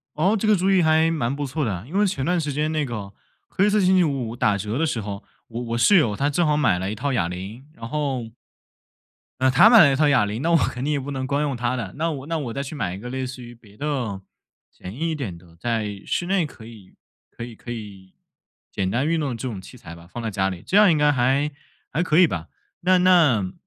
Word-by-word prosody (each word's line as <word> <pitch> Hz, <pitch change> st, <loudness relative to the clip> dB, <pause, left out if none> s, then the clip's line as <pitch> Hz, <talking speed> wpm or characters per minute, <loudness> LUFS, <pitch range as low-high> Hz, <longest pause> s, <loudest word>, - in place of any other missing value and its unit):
哦， 190 Hz, +8 st, +2 dB
这 215 Hz, -, -1 dB
个 215 Hz, -, +5 dB
主 190 Hz, 0 st, +1 dB
意 190 Hz, -2 st, +4 dB
还 160 Hz, 0 st, +3 dB
蛮 135 Hz, -5 st, -1 dB
不 145 Hz, 0 st, -3 dB
错 150 Hz, +3 st, -2 dB
的 110 Hz, -, -1 dB
啊。 90 Hz, +1 st, -6 dB
因 160 Hz, -, -12 dB
为 210 Hz, -, +4 dB
前 140 Hz, -9 st, -2 dB
段 180 Hz, +2 st, +1 dB
时 150 Hz, -3 st, -2 dB
间 150 Hz, +2 st, -1 dB
那 155 Hz, -1 st, 0 dB
个 105 Hz, -6 st, -6 dB, 0.4 s
黑 200 Hz, +2 st, +2 dB
色 210 Hz, 0 st, +2 dB
星 190 Hz, 0 st, +4 dB
期 180 Hz, -, +4 dB
五 135 Hz, -6 st, -2 dB
五 115 Hz, -, -7 dB
打 105 Hz, -3 st, +1 dB
折 105 Hz, +5 st, -3 dB
的 165 Hz, -, +1 dB
时 135 Hz, -7 st, -1 dB
候， 100 Hz, -1 st, -6 dB, 0.3 s
我 120 Hz, +1 st, -5 dB
我 115 Hz, 0 st, -3 dB
室 205 Hz, +12 st, +5 dB
友 120 Hz, -, +3 dB
他 140 Hz, +7 st, 0 dB
正 165 Hz, +4 st, +1 dB
好 150 Hz, -1 st, +2 dB
买 130 Hz, -12 st, +2 dB
了 95 Hz, +2 st, -3 dB
一 -, -, -3 dB
套 135 Hz, +5 st, -2 dB
哑 85 Hz, -9 st, 0 dB
铃， 95 Hz, +8 st, -7 dB
然 115 Hz, 0 st, -8 dB
后 140 Hz, -2 st, -2 dB, 1.2 s
啊， 130 Hz, 0 st, +3 dB
他 135 Hz, -, +7 dB
买 230 Hz, -2 st, +9 dB
了 140 Hz, -6 st, +7 dB
一 -, -, +1 dB
套 150 Hz, +1 st, +3 dB
哑 130 Hz, -7 st, +4 dB
铃， 105 Hz, +3 st, -4 dB
那 165 Hz, -, +1 dB
我 170 Hz, -, +5 dB
肯 125 Hz, -4 st, -1 dB
定 150 Hz, -, 0 dB
也 145 Hz, -, 0 dB
不 140 Hz, +2 st, -6 dB
能 130 Hz, -1 st, -3 dB
光 140 Hz, +2 st, 0 dB
用 140 Hz, -3 st, -1 dB
他 120 Hz, +1 st, -1 dB
的。 125 Hz, -, -5 dB
那 165 Hz, +3 st, -1 dB
我 140 Hz, -3 st, -6 dB
那 165 Hz, +1 st, -2 dB
我 130 Hz, -6 st, -4 dB
再 140 Hz, +4 st, -3 dB
去 140 Hz, +3 st, -7 dB
买 100 Hz, -11 st, -3 dB
一 95 Hz, -, -7 dB
个 120 Hz, -, -8 dB
类 130 Hz, +1 st, -3 dB
似 130 Hz, 0 st, -8 dB
于 120 Hz, 0 st, -11 dB
别 105 Hz, -3 st, -20 dB
的 130 Hz, -9 st, -3 dB, 0.5 s
简 90 Hz, +2 st, -10 dB
易 165 Hz, +6 st, -2 dB
一 -, -, -1 dB
点 115 Hz, -, -5 dB
的， 85 Hz, -1 st, -18 dB
在 105 Hz, -1 st, -2 dB
室 175 Hz, -, -1 dB
内 185 Hz, -3 st, +1 dB
可 120 Hz, -6 st, -14 dB
以 110 Hz, -5 st, -14 dB, 0.4 s
可 -, -, -7 dB
以 120 Hz, -1 st, -9 dB
可 120 Hz, -, -8 dB
以 100 Hz, -5 st, -10 dB, 0.6 s
简 95 Hz, -2 st, -2 dB
单 125 Hz, +7 st, 0 dB
运 165 Hz, +1 st, +1 dB
动 145 Hz, -3 st, -1 dB
的 -, -, -3 dB
这 130 Hz, +3 st, -4 dB
种 100 Hz, -5 st, -6 dB
器 125 Hz, -, -13 dB
材 85 Hz, -8 st, -11 dB
吧， 85 Hz, 0 st, -14 dB
放 120 Hz, -, -6 dB
在 115 Hz, -, -2 dB
家 95 Hz, -1 st, 0 dB
里， 90 Hz, -2 st, -6 dB
这 190 Hz, -, +1 dB
样 205 Hz, -2 st, +7 dB
应 160 Hz, -, +3 dB
该 150 Hz, 0 st, +4 dB
还 135 Hz, +3 st, +1 dB, 0.4 s
还 165 Hz, -, 0 dB
可 165 Hz, -2 st, +2 dB
以 180 Hz, -, +7 dB
吧。 85 Hz, -, -5 dB, 0.3 s
那 185 Hz, +1 st, +3 dB
那， 155 Hz, -, +4 dB
130 Hz, 295 characters per minute, -23 LUFS, 110-155 Hz, 1.2 s, 买